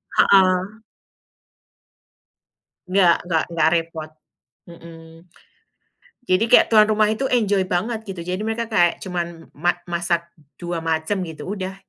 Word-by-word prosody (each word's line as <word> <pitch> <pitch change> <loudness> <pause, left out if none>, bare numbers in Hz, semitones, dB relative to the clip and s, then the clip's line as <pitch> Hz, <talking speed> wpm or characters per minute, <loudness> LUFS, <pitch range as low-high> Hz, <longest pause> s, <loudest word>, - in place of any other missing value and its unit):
Heeh. 190 +2 +3 2.1
Nggak 180 -2 +4
nggak 160 -3 +1
nggak 160 -1 +2
repot. 165 -1 -4 0.6
Heeh. 165 0 -14 1.0
Jadi 205 -1 +1
kayak - - +6
tuan 215 -2 +6
rumah 215 0 +2
itu 220 +5 -2
enjoy 205 -7 +1
banget 205 +6 -2
gitu, 190 -4 -7
jadi 180 +4 -4
mereka 225 +1 -3
kayak 175 -5 +2
cuman 170 -3 -6
ma 175 +3 +1 0.2
masak 170 0 -1 0.3
2 175 -1 -5
macem 160 +4 -1
gitu, 160 +3 -9
udah. 190 -2 -5
180 Hz, 120 wpm, -21 LUFS, 170-205 Hz, 2.1 s, kayak